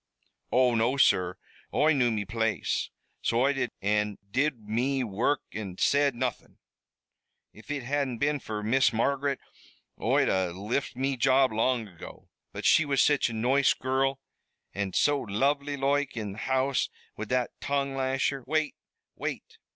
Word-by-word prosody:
"Oh, 125 Hz, -1 st, +4 dB
no, 115 Hz, +4 st, +1 dB
sur, 90 Hz, -8 st, +3 dB, 0.3 s
Oi 155 Hz, +1 st, +3 dB
knew 125 Hz, -4 st, +3 dB
me 105 Hz, -3 st, -2 dB
place, 110 Hz, +2 st, -1 dB, 0.3 s
so 115 Hz, +1 st, +1 dB
Oi 140 Hz, +2 st, +3 dB
did, 135 Hz, -3 st, -1 dB
an' 105 Hz, 0 st, +1 dB
did 135 Hz, -1 st, 0 dB
me 130 Hz, +5 st, 0 dB
wurruk 120 Hz, +6 st, 0 dB
an' 95 Hz, -4 st, -6 dB
said 140 Hz, -2 st, +3 dB
nothin'. 125 Hz, -1 st, -4 dB, 1.0 s
If 110 Hz, -, -16 dB
it 145 Hz, -3 st, -3 dB
hadn't 135 Hz, -1 st, -1 dB
been 145 Hz, +3 st, 0 dB
fer 105 Hz, -4 st, -5 dB
Miss 130 Hz, +5 st, +3 dB
Margaret 140 Hz, +4 st, 0 dB, 0.6 s
Oi'd -, -, +3 dB
a 95 Hz, -2 st, +1 dB
lift 105 Hz, +10 st, -3 dB
me 135 Hz, +1 st, -1 dB
job 130 Hz, +1 st, +4 dB
long 115 Hz, 0 st, +1 dB
ago. 90 Hz, -4 st, -12 dB, 0.2 s
But -, -, -7 dB
she 160 Hz, -, +6 dB
was 140 Hz, -2 st, 0 dB
such 145 Hz, -4 st, +3 dB
a -, -, -6 dB
noice 125 Hz, +5 st, +3 dB
girrul, 135 Hz, +1 st, 0 dB, 0.6 s
an' 100 Hz, -2 st, -3 dB
so 145 Hz, -1 st, +2 dB
lonely 140 Hz, +7 st, 0 dB
loike, 140 Hz, -1 st, 0 dB
in 105 Hz, -3 st, -3 dB
the 100 Hz, -, -10 dB
house 130 Hz, +1 st, 0 dB, 0.3 s
wid 110 Hz, -1 st, -6 dB
that 125 Hz, -1 st, 0 dB
tongue 140 Hz, -1 st, -1 dB
lasher 135 Hz, 0 st, -1 dB
" -, -, -42 dB
"Wait! 155 Hz, -1 st, 0 dB, 0.4 s
wait! -, -, -6 dB
130 Hz, 160 wpm, -28 LUFS, 110-140 Hz, 1.0 s, she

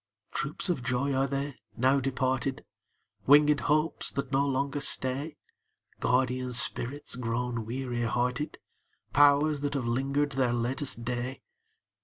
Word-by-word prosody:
Troops 140 Hz, +7 st, -2 dB
of 175 Hz, -8 st, 0 dB
joys 130 Hz, +3 st, 0 dB
are 135 Hz, +1 st, +1 dB
they, 140 Hz, +1 st, -3 dB, 0.2 s
now 130 Hz, +3 st, +3 dB
departed? 130 Hz, 0 st, -1 dB, 0.6 s
Winged 145 Hz, +1 st, +6 dB
hopes 155 Hz, +5 st, 0 dB
that 140 Hz, -1 st, -4 dB
no 140 Hz, +1 st, +2 dB
longer 140 Hz, +1 st, -1 dB
stay? 140 Hz, +3 st, 0 dB, 0.6 s
Guardian 125 Hz, 0 st, 0 dB
spirits 125 Hz, +4 st, +1 dB
grown 120 Hz, -1 st, -3 dB
weary 120 Hz, 0 st, -3 dB
hearted? 125 Hz, +6 st, -1 dB, 0.6 s
Powers 145 Hz, +1 st, +4 dB
that 145 Hz, 0 st, -2 dB
have 130 Hz, -3 st, -1 dB
linger'd 135 Hz, +4 st, 0 dB
their 130 Hz, -3 st, +1 dB
latest 120 Hz, 0 st, -2 dB
day? 125 Hz, +2 st, -4 dB
135 Hz, 125 wpm, -29 LUFS, 125-140 Hz, 0.6 s, Winged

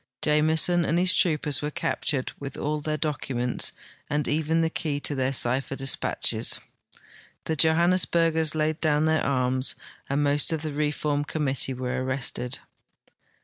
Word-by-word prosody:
Jameson 160 Hz, +3 st, +3 dB
and 165 Hz, -, +1 dB
his 180 Hz, +1 st, +4 dB
troopers 150 Hz, -4 st, +1 dB
were 150 Hz, -, -2 dB
captured 150 Hz, -3 st, -2 dB
with 140 Hz, -1 st, -7 dB
all 150 Hz, +1 st, -2 dB
their 155 Hz, +1 st, -2 dB
docu 150 Hz, -4 st, -3 dB
ments 125 Hz, +1 st, +1 dB, 0.4 s
and 145 Hz, 0 st, -1 dB
even 160 Hz, +2 st, +1 dB
the 165 Hz, -, +1 dB
key 145 Hz, -4 st, -2 dB
to 145 Hz, -, -1 dB
their 130 Hz, -1 st, 0 dB
cipher 135 Hz, +1 st, +1 dB
dispatches. 135 Hz, 0 st, 0 dB, 0.8 s
The 160 Hz, -, -2 dB
Johan 170 Hz, +2 st, +4 dB
nesburgers 165 Hz, -3 st, +2 dB
laid 155 Hz, 0 st, -1 dB
down 155 Hz, -1 st, +2 dB
their 160 Hz, 0 st, +2 dB
arms, 130 Hz, -1 st, 0 dB, 0.3 s
and 140 Hz, +2 st, +1 dB
most 145 Hz, +2 st, +2 dB
of 160 Hz, -1 st, -2 dB
the 155 Hz, -2 st, -3 dB
reform 150 Hz, 0 st, -1 dB
com 150 Hz, +1 st, -3 dB
mittee 135 Hz, -1 st, 0 dB
were 130 Hz, 0 st, -2 dB
arrested. 130 Hz, -1 st, -3 dB
150 Hz, 155 wpm, -26 LUFS, 135-160 Hz, 0.8 s, his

